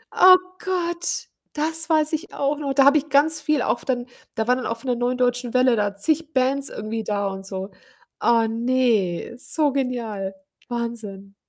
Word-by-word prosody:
Oh 370 0 +9 0.3
Gott, 345 -2 -2 0.3
das 320 +2 0
weiß 310 0 +2
ich 320 +5 -4
auch 285 +1 -1
noch. 280 -2 -2
Da 270 0 +5
habe 285 +2 +6
ich 300 +1 -3
ganz 305 +3 +3
viel 300 -2 +1
auf 240 - -1
dann 245 -2 -2 0.3
da 220 -1 -1
waren 250 0 +3
dann 255 - -4
auch 230 - -3
von 230 - -11
der 250 - +1
Neuen 245 +1 -1
Deutschen 245 -1 0
Welle 255 -1 +4
da 205 -2 -1
zig 315 +9 -1
Bands 270 +2 +1
irgendwie 220 +1 -5
da 205 -1 -1
und 195 0 -6
so. 190 0 -5 0.5
Ah 230 -1 +3
ne, 230 -5 0
so 295 +3 +1
genial. 235 -8 -3 0.4
Wahnsinn. 220 -5 -5
250 Hz, 185 wpm, -23 LUFS, 225-295 Hz, 0.5 s, Oh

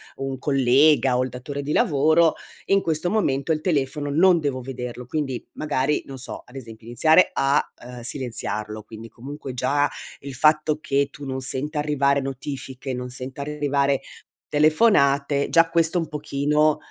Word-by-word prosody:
un 135 0 -4
collega 135 0 +3
o 125 - +2
il 130 - -3
datore 140 +3 -6
di 150 - -2
lavoro, 160 - +3 0.3
in 195 0 +3
questo 160 +2 -1
momento 150 -9 0
il 155 - +1
telefono 145 -3 -1
non 170 +3 +5
devo 140 -4 -2
vederlo. 125 -1 -6
Quindi 135 -3 -3
magari, 150 -1 -1
non 135 -1 -9
so, 130 - -7
ad 120 - -18
esempio 115 -3 -10
iniziare 155 +9 +4
a, 135 +2 +2 0.2
uhm, 125 0 -9
silenziarlo, 110 -4 -4
quindi 110 +1 -11
comunque 135 +3 -8
già 145 +4 +1 0.3
il 140 0 -7
fatto 155 +2 +3
che 140 -1 0
tu 145 - -10
non 130 -1 -4
senta 140 +4 -3
arrivare 140 -1 +1
notifiche, 135 0 -6
non 125 0 -5
senta 130 +2 -7
arrivare 140 -2 0 0.5
telefonate, 145 -3 +3
già 165 0 +4
questo 165 +1 +2
un 165 - -3
pochino 150 0 +1
140 Hz, 155 wpm, -23 LUFS, 130-150 Hz, 0.5 s, non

